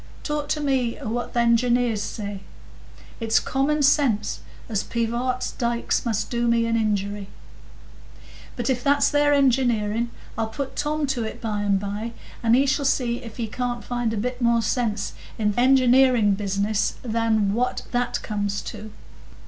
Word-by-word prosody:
Talk 295 -1 -2
to 305 - 0
me 265 -5 0
o' - - -7
what 240 +3 -3
th' - - -1
engineers 235 -1 +3
say! 210 - -5
I - - -6
say - - -13 0.8
it's 225 -1 +2
common 290 +3 0
sense, 255 -7 +2 0.3
as 210 -4 -1
Pivart's 240 +2 -1
dikes 235 -1 -1
must 220 -3 -1
do 240 -1 0
me 230 0 +3
an 230 0 0
injury. 205 -2 -1 1.3
But 240 -1 -3
if 245 -1 -2
that's 285 0 +4
their 290 0 +3
engineering, 240 -5 +2 0.3
I'll 225 - 0
put 265 +4 -5
Tom 300 0 0
to 265 -4 -1
it 220 - -6
by 210 -2 -2
and 200 -1 +2
by, 205 +4 -4 0.3
and 230 0 +4
he 270 +2 +4
shall 280 +1 +1
see 245 -3 +1
if 230 -2 -10
he 235 - -1
can't 245 +2 -3
find 240 -2 -1
a 225 - -2
bit 250 +4 -3
more 235 -1 +3
sense 220 -3 -1 0.2
in 210 -1 +1
th' 240 - -2
engineering 255 -4 +5
business 200 +1 0
than 220 -3 +1
what 245 +3 -1
that 245 0 -1
comes 205 -1 -2
to." 215 0 -9
235 Hz, 170 wpm, -24 LUFS, 215-255 Hz, 1.3 s, engineering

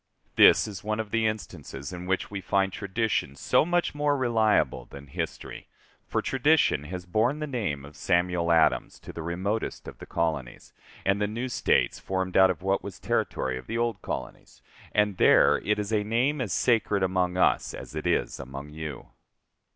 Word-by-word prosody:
This - - +6
is 100 -4 -8
one 110 +1 -2
of 110 -2 -4
the 115 -1 +2
instances 90 -8 -6
in 90 0 -7
which 95 +2 -1
we 100 -1 -4
find 95 0 +1
tradition 100 - -1
so - - +2
much 175 +2 0
more 145 -1 +1
reliable 110 - +2
than 70 +3 -11
history; 70 - -6 0.4
for - - -1
tradition 135 - +2
has 90 +2 -6
borne 110 +10 +1
the 155 - -3
name 100 - -3
of 75 +1 -13
Samuel 85 -1 +1
Adams 80 -1 +2
to - - -10
the 85 - -6
remotest 95 +7 -3
of - - -10
the - - -10
colonies, 80 -7 -3 0.3
and 100 +1 +2
the 105 - +2
new 115 +5 -3
States 125 - +1
formed 95 -1 -3
out 95 0 +7
of 90 -1 -3
what 95 +1 0
was 100 -3 -7
territory 65 -1 -1
of - - -14
the 115 - -3
old 115 -4 -1
colonies; - - -7 0.3
and 105 -2 +1
there - - +5
it 105 - 0
is 105 +1 -3
a 105 -1 +2
name 125 +7 0
as 110 -7 -3
sacred 105 -4 +2
among 90 -1 0
us - - +2
as - - -9
it 80 +2 -3
is 85 - 0
among 70 +2 -8
you. 80 -2 -7
95 Hz, 185 wpm, -27 LUFS, 85-110 Hz, 0.4 s, out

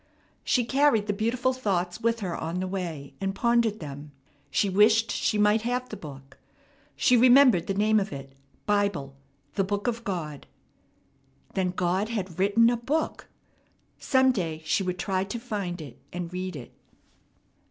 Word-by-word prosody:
She 245 -2 +2
carried 265 -5 +3
the 205 - -1
beautiful 235 +5 0
thoughts 190 -6 -2
with 230 0 0
her 180 -4 -3
on 165 +3 -3
the 185 - -2
way, 175 -7 -5
and 195 0 -2
pondered 235 -1 +2
them. 145 -1 -8 0.4
She 205 - +1
wished 215 +4 +4
she 215 - 0
might 210 +1 +3
have 250 +2 -2
the - - -6
book. 135 -3 -11 0.6
She 250 - +4
remembered 250 -5 +6
the 195 - -1
name 215 +2 +3
of 200 - -3
it, 135 -1 -8 0.3
Bible, 200 -10 0 0.4
the 195 - +1
Book 205 +1 -2
of 235 -1 -2
God. 160 -8 -5 1.1
Then 185 -1 0
God 185 +3 0
had 190 -6 -4
written 215 +5 +4
a 240 - 0
book! 290 +7 -2 0.7
Some 260 -1 +3
day 165 -8 -3
she 155 +5 +1
would 180 -1 -2
try 190 0 -1
to 200 +4 -5
find 200 -7 -4
it 145 -6 -10
and 175 0 -5
read 185 -1 -4
it. 130 -4 -9
200 Hz, 165 wpm, -27 LUFS, 175-230 Hz, 1.1 s, remembered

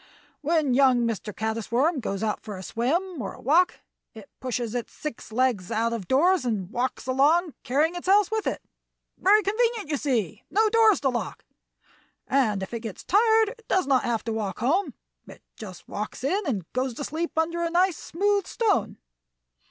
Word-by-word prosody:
"When 305 -3 +1
young 255 -2 +4
Master 225 -2 -3
Caddis 220 +1 -4
Worm 280 +6 +2
goes 200 -3 -3
out 215 -1 -1
for 210 -3 -7
a 185 - -8
swim 315 - -1
or 195 - -5
a - - -15
walk 335 +8 +2 0.3
it 215 -3 -12
pushes 240 -3 -3
its 245 -2 -4
six 300 -7 -7
legs 225 -6 0
out 230 +1 0
of 210 -6 -5
doors, 345 +5 +3
and 210 -6 -2
walks 245 +2 -2
along, 295 +6 +2
carrying 295 +7 +1
its 355 +1 -7
house 405 +1 +4
with 440 -1 -1
it. - - -3 0.6
Very 415 +3 +5
convenient, 440 -3 0
you 295 - +1
see! 230 - -1
No 435 +3 +3
doors 445 -2 +4
to 275 - +2
lock! 245 -2 -4 0.8
And 220 -8 +1
if 190 - -7
it 230 - -2
gets 220 -4 -8
tired 440 +2 +4
it 460 -1 -13
does 375 - +2
not 265 -2 +3
have 235 -2 -1
to 225 - -3
walk 205 -4 -3
home; 320 - 0 0.3
it - - -14
just 190 -5 -10
walks 210 +4 -6
in 370 +7 0
and 205 - -2
goes 255 -1 -1
to 285 - -5
sleep 320 +3 -4
under 335 +1 0
a 335 - 0
nice, 355 0 +2
smooth 400 +2 0
stone. 445 -4 0
270 Hz, 190 wpm, -25 LUFS, 230-360 Hz, 0.8 s, Very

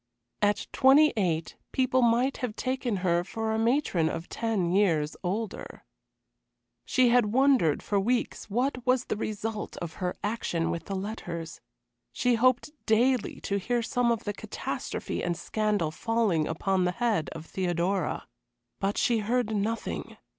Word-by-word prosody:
At 205 0 +2
twenty 285 +4 +6
eight 170 -6 -1
people 260 0 +2
might 240 +3 +3
have 240 -4 -3
taken 255 -4 -1
her 170 -1 +3
for 220 +4 -3
a 220 - 0
matron 225 - +2
of 165 +1 -5
ten 215 -7 -1
years 165 -6 +2
older. 205 +4 -4 1.0
She 255 -1 +3
had 240 -2 +4
wondered 245 - +3
for 205 - +1
weeks 235 +2 -1
what 250 +3 0
was 255 0 +2
the - - -2
result 215 0 -4
of 170 -2 -5
her 180 -1 -1
action 200 -6 -1
with 165 -1 -4
the 195 - -4
letters. 180 -5 -5 0.5
She 245 - +2
hoped 255 +4 +2 0.2
daily 240 +2 +2
to 200 0 -1
hear 245 +5 0
of 235 - -1
some 235 -1 +2
catastrophe 205 -2 -4
and 175 -1 -1
scandal 205 -4 0
falling 215 -5 +1
upon 185 +3 0
the 180 - 0
head 220 - 0
of 160 0 -8
Theodora. 180 +1 -1 0.5
But 195 +1 -1
she 235 -2 +2
heard 220 0 0
nothing. 220 +3 -3
215 Hz, 145 wpm, -28 LUFS, 180-240 Hz, 1.0 s, twenty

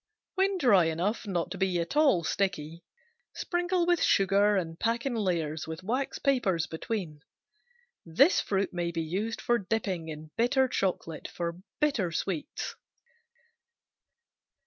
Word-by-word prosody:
When 385 0 +1
dry 210 - +5
enough 180 +8 -1
not 175 -2 -2
to 190 - -5
be 185 -2 +1
at 170 +11 -3
all 280 - +4
sticky, 165 -3 -2 0.5
sprinkle 350 0 0
with 350 -1 +2
sugar 200 +1 +4
and 165 -3 -3
pack 235 +2 0
in 270 - 0
layers 165 -8 -1
with 160 +2 -6
wax 255 +7 -1
papers 205 - +1
between. 165 -2 -4 0.8
This 270 - +4
fruit 195 -1 -1
may 175 -1 -1
be 165 -1 -2
used 200 +8 -3
for 240 0 +1
dipping 190 -5 -2
in 155 0 -8
bitter 260 +3 +3
chocolate 180 -8 -2
for 170 0 -4 0.2
bitter 240 - +1
sweets. 165 -1 -3
190 Hz, 135 wpm, -29 LUFS, 170-240 Hz, 0.8 s, dry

